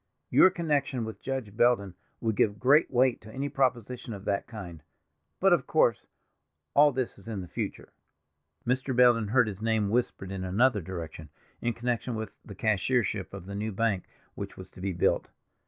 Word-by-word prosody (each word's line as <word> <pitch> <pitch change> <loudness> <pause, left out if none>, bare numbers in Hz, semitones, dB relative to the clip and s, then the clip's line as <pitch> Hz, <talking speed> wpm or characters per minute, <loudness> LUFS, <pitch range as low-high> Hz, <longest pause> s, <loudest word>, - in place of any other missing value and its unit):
Your 185 - +7
connection 145 -8 -1
with 110 - -8
Judge 130 -6 -4
Belden 110 -6 +3 0.3
would 110 -2 0
give 100 0 +2
great 145 +5 +5
weight 125 -1 +2
to 110 - -12
any 140 +4 -3
proposition 125 -3 -1
of 100 -1 -9
that 100 -1 -1
kind. 90 -9 -8 0.6
But, - - +5
of - - +1
course, - - +2 0.7
all 145 +1 +6
this 130 -5 -3
is 95 - -16
in 105 -4 -4
the 90 - -8
future." - - -5 0.8
Mr. 130 +1 0
Belden 120 -3 +5
heard 125 +3 +4
his 100 -1 -6
name 110 -2 +1
whispered 115 -5 -1
in 95 -1 -4
another 105 +4 +2
direction, 80 -3 -7 0.3
in 120 - 0
connection 120 +1 -2
with 110 0 -4
the 100 - -10
cashiership 105 -1 0
of 100 -3 -8
the 100 - -7
new 105 +2 -2
bank 100 -2 0 0.3
which - - -7
was - - -10
to 90 - -13
be 95 +1 -1
built. 85 - +1
110 Hz, 180 wpm, -28 LUFS, 100-125 Hz, 0.8 s, Your